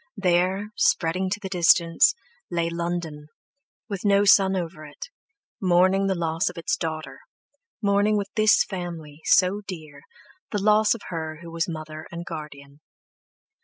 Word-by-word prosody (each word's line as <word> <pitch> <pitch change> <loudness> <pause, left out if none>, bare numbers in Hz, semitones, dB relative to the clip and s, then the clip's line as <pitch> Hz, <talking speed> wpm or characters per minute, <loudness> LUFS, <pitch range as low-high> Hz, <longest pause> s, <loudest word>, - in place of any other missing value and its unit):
There—spreading 185 -1 +1
to 205 +2 -2
the 195 - -6
distance, 170 - +4 0.3
lay 170 -1 -1
London, 170 -3 -4 0.6
with 200 -4 -5
no 200 -1 +3
sun 195 -1 +5
over 170 -3 -5
it, 150 - -10 0.5
mourning 185 +1 +3
the 190 - 0
loss 165 0 0
of 180 - -12
its 170 - -1
daughter, 160 -1 -5 0.6
mourning 205 +1 +2
with 200 0 -3
this 215 0 +5
family, 165 -5 -7
so 190 +2 +3
dear, 155 -6 -9 0.5
the 210 - -2
loss 215 +1 +4
of 230 - -10
her 160 -2 -5
who 170 - -9
was 165 +1 -2
mother 155 -1 -7
and 170 0 -7
guardian. 145 -3 -9
175 Hz, 140 wpm, -24 LUFS, 160-195 Hz, 0.6 s, sun